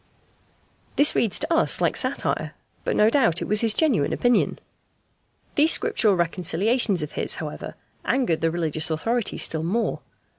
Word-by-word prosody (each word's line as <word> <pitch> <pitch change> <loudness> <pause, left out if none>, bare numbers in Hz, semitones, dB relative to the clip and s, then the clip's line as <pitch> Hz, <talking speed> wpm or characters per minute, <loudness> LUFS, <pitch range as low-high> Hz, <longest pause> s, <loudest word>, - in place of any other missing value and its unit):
This 290 - +5
reads 220 -5 0
to 315 +3 -1
us 325 - +2
like - - +1
satire, - - -2 0.3
but - - -1
no 210 - +4
doubt 230 - +2
it - - -4
was 210 0 +2
his 225 -2 +2
genuine 260 - +1
opinion. 245 0 +1 1.0
These 310 +3 +4
Scriptural 210 -4 +1
reconciliations 180 +3 0
of 150 - -6
his, - - -2
however, - - -7 0.3
angered 245 -12 0
the 165 - +2
religious 160 -2 -1
authorities 225 +8 -2
still 160 - -1
more. 205 +8 -1
210 Hz, 150 wpm, -23 LUFS, 165-245 Hz, 1.0 s, This